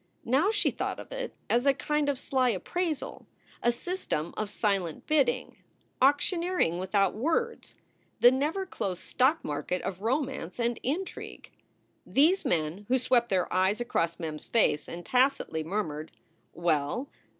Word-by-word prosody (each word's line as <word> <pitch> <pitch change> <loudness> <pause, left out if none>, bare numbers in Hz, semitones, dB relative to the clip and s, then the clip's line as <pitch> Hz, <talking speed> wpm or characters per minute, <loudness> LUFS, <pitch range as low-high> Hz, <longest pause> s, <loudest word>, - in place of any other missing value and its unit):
Now 270 - +3
she 430 -1 +2
thought - - -3
of - - -10
it - - -4
as 245 +4 +2
a 275 - +5
kind 300 +1 0
of 280 - 0
sly 260 -1 +1
appraisal, 310 - -3 0.3
a 240 - +3
system 240 - -3
of 215 -1 -2
silent 195 -7 -1
bidding, 260 -5 +1 0.4
auctioneering 290 - +2
without 190 +1 +2
words 335 - -1 0.4
the 245 - +8
never 300 +9 0
closed 190 - -4
stock 270 +5 +2
market 150 +5 -2
of 190 0 -4
romance 255 - -2
and 235 0 0
intrigue. 335 +9 -4 0.5
These 330 +8 +3
men, 165 +4 -1
who 260 - +3
swept 240 -1 +2
their 185 -2 0
eyes 190 +4 +2
across 170 -9 -1
Mem 160 -2 -3
s 150 - -9
face 205 -10 +2
and 170 0 -7
tacitly 255 - +2
murmured, 160 -4 -3 0.4
"Well?" 170 - 0
240 Hz, 145 wpm, -29 LUFS, 180-290 Hz, 0.5 s, the